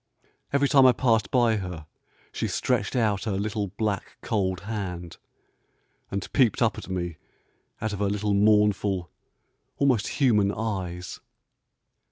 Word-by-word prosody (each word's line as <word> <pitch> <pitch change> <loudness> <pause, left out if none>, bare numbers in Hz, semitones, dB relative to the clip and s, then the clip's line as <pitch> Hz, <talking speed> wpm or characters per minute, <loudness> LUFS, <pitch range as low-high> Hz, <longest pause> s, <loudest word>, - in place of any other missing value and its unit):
Every 140 0 +3
time 135 -2 +6
I 125 - +6
passed 115 -4 +2
by 120 -3 +3
her 90 -5 -6 0.5
she - - -2
stretched - - -1
out 110 -4 +1
her 110 - -1
little, 105 0 -2
black, 100 +1 -3
cold 95 -4 -1
hand, 90 -5 -5 0.9
and 100 -1 -5
peeped 130 -3 +3
up 115 - +2
at - - -10
me 85 -3 -3 0.6
out 110 0 -2
of 100 - -5
her 100 -1 +1
little 105 0 0
mournful, 105 -3 +2 0.7
almost 130 -7 +2
human 105 -8 +3
eyes. 95 -5 -4
105 Hz, 135 wpm, -26 LUFS, 95-110 Hz, 0.9 s, time